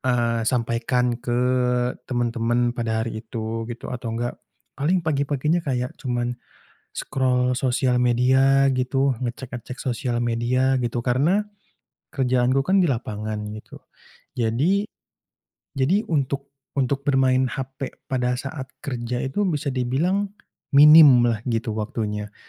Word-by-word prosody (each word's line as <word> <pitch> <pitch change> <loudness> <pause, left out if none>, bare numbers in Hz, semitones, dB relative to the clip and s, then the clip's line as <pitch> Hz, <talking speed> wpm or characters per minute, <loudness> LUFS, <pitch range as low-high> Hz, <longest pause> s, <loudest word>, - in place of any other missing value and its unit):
eee, 115 -3 +1
sampaikan 120 +1 0
ke 120 0 -1 0.7
teman-teman 120 -1 0
pada 110 -2 -1
hari 110 -1 -5
itu 115 0 -5
gitu 120 +1 -7
atau 115 -2 -4
enggak, 120 +1 -4 0.4
paling 170 +4 +1
pagi-paginya 150 +2 0
kayak 125 -5 -2
cuman 120 -2 -1 0.6
scroll 125 -1 0
sosial 125 -1 +1
media 130 +3 +4
gitu, 135 +1 +1
ngecek-ngecek 125 0 -6
sosial 125 -2 -2
media, 120 +3 +1
gitu. 120 0 -2
Karena 145 +11 +3 0.7
kerjaanku 130 -1 +1
kan 190 +4 +3
di 175 - +3
lapangan 110 -4 -3 0.2
gitu, 110 0 -10 0.6
jadi 135 - +1 0.9
jadi, 160 +10 +2
untuk 140 -2 -1 0.2
untuk 135 0 -1
bermain 130 -2 +3
HP 135 +1 -5 0.2
pada 125 -2 0
saat 135 +2 -5 0.2
kerja 125 -3 -3
itu 195 +10 -1
bisa 150 -5 -1
dibilang 140 +10 0 0.5
minimlah 140 -6 +7
gitu 115 -2 -2
waktunya, 105 -1 -3
125 Hz, 115 wpm, -23 LUFS, 120-135 Hz, 0.9 s, minimlah